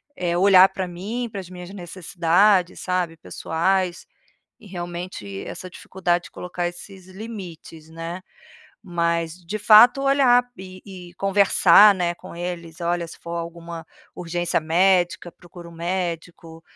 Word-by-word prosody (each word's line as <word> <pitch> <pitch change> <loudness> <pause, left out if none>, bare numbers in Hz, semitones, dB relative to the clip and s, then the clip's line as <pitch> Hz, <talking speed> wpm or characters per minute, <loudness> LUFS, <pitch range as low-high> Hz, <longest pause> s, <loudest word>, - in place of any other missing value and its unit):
eh, 175 -7 -2
olhar 190 +1 +7
pra 190 -1 -4
mim, 210 +8 -5
para 200 - -5
as 185 -2 -9
minhas 180 -1 -10
necessidades, 180 0 +1
sabe, 180 -3 -2
pessoais. 175 +3 -2 0.5
E 220 - -17
realmente 175 - -7
essa 185 - -8
dificuldade 180 -1 -2
de - - -12
colocar 180 0 -5
esses 185 +1 -12
limites, 185 -6 -10
né. 165 +3 -7 0.6
Mas 170 -3 -1
de 205 +6 -5
fato 225 +6 +7
olhar, 270 -3 +4
e 185 0 -11
e 180 -3 -11
conversar, 195 0 +5
né, 175 -2 -1
com - - -12
eles, 170 -1 -6
olha 170 0 -1
se 165 - -12
for 170 0 -6
alguma 170 -1 -7 0.3
urgência 175 0 -2
médica, 175 +1 +1
procuro 175 -1 -13
um - - -14
médico, 170 -1 -5
175 Hz, 135 wpm, -22 LUFS, 170-190 Hz, 0.6 s, olhar